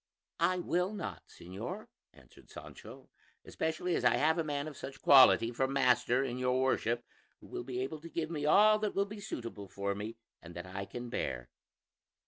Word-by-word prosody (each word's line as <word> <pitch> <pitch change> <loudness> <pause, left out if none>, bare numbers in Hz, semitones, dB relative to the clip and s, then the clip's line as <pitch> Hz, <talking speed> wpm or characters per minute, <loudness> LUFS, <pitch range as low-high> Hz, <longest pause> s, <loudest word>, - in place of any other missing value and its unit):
"I 185 - +2
will 180 +2 0
not, 210 - -5
señor," 110 - -7 0.3
answered - - -19
Sancho; - - -12 0.3
"especially 160 +3 -2
as - - -1
I - - +5
have 160 +3 +2
a - - +1
man 145 -1 -3
of 155 - -8
such 135 +1 -8
quality 130 -4 +7
for 130 +2 0
master 125 -1 +2
in 125 -2 -3
your 125 0 +1
Worship, 120 -2 0 0.3
who - - -16
will - - -6
be 125 0 -4
able 150 +4 -4
to 165 - -9
give 165 -1 -3
me 150 -3 -3
all 215 +8 +6
that 210 -1 -2
will 200 - +2
be 210 +1 -9
suitable 115 - -6
for 100 +1 -3
me 105 +3 -6 0.2
and 85 0 -12
that 90 +1 -6
I 95 +1 -5
can 120 +4 -7
bear." - - -3
130 Hz, 190 wpm, -32 LUFS, 115-165 Hz, 0.3 s, quality